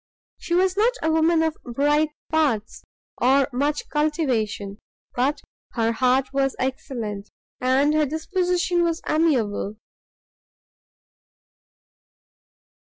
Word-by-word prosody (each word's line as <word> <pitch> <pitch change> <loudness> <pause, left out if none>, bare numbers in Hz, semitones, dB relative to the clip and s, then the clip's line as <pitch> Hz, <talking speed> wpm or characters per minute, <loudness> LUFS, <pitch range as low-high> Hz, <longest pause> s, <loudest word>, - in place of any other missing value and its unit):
She 345 - -2
was 370 +1 +2
not 445 +5 +3
a 320 - +2
woman 320 +1 +3
of 320 -1 0
bright 295 +5 +1 0.2
parts, 280 -10 0 0.4
or 265 +2 +4
much 285 +4 -1
cultivation, 250 -10 -1 0.3
but 265 +4 0 0.3
her 230 -1 +1
heart 255 +3 +1
was 270 -1 +1
excellent, 230 -6 -4 0.3
and 265 +4 +2
her 305 -1 +2
disposition 350 +3 0
was 335 -1 0
amiable. 245 -10 +1
290 Hz, 100 wpm, -23 LUFS, 250-320 Hz, 0.4 s, or